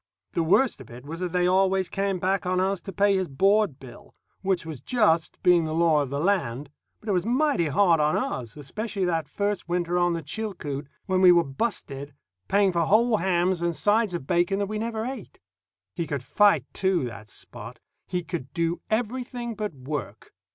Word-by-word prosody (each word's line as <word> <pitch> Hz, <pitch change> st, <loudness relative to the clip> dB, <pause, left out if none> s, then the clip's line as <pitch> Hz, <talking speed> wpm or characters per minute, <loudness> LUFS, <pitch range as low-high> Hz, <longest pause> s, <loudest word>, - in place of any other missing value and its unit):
The 170 Hz, -, 0 dB
worst 185 Hz, -, +2 dB
of 125 Hz, -, -13 dB
it 125 Hz, +3 st, -11 dB
was 165 Hz, +3 st, -7 dB
that 180 Hz, -1 st, -3 dB
they 180 Hz, 0 st, +1 dB
always 190 Hz, 0 st, +2 dB
came 195 Hz, -1 st, -1 dB
back 185 Hz, +1 st, 0 dB
on 185 Hz, 0 st, +1 dB
us 190 Hz, 0 st, 0 dB
to 195 Hz, -, -7 dB
pay 200 Hz, 0 st, +3 dB
his 190 Hz, -1 st, 0 dB
board 195 Hz, 0 st, +2 dB
bill, 170 Hz, +11 st, -14 dB, 0.3 s
which 190 Hz, -3 st, 0 dB
was 155 Hz, -6 st, -7 dB
just, 170 Hz, -, +1 dB
being 175 Hz, -2 st, +5 dB
the 155 Hz, 0 st, -3 dB
law 165 Hz, -3 st, +3 dB
of 140 Hz, -, -3 dB
the 140 Hz, +1 st, -3 dB
land; 145 Hz, -7 st, -1 dB, 0.3 s
but 220 Hz, -, -17 dB
it -, -, +1 dB
was 180 Hz, -3 st, +1 dB
mighty 250 Hz, -, +1 dB
hard 165 Hz, +2 st, +3 dB
on 150 Hz, 0 st, +2 dB
us, 120 Hz, +1 st, -4 dB
especially 195 Hz, -, -3 dB
that 165 Hz, -4 st, -1 dB
first 200 Hz, +4 st, -2 dB
winter 175 Hz, 0 st, 0 dB
on 175 Hz, -1 st, +2 dB
the 165 Hz, -1 st, -4 dB
Chilcoot, 150 Hz, -6 st, -5 dB, 0.2 s
when 185 Hz, -1 st, +1 dB
we 180 Hz, -1 st, +8 dB
were 170 Hz, -1 st, +5 dB
busted, 140 Hz, -, -4 dB, 0.3 s
paying 200 Hz, -1 st, +3 dB
for 170 Hz, -2 st, +1 dB
whole 220 Hz, +3 st, +4 dB
hams 180 Hz, -1 st, +1 dB
and 170 Hz, -1 st, 0 dB
sides 210 Hz, -1 st, +2 dB
of 150 Hz, -, -5 dB
bacon 175 Hz, +4 st, +1 dB
that 200 Hz, -, 0 dB
we 215 Hz, +1 st, -4 dB
never 225 Hz, 0 st, -3 dB
ate. 260 Hz, +2 st, -7 dB, 0.5 s
He 170 Hz, -3 st, -3 dB
could 140 Hz, -4 st, -3 dB
fight, 200 Hz, -, +3 dB
too, 190 Hz, -5 st, +1 dB
that 115 Hz, -3 st, -8 dB
Spot. -, -, -10 dB, 0.3 s
He 180 Hz, -1 st, -2 dB
could 160 Hz, -6 st, -6 dB
do 170 Hz, 0 st, -1 dB
everything 240 Hz, +1 st, -2 dB
but 210 Hz, -6 st, -4 dB
work. 130 Hz, -6 st, -6 dB
180 Hz, 200 wpm, -26 LUFS, 155-200 Hz, 0.5 s, we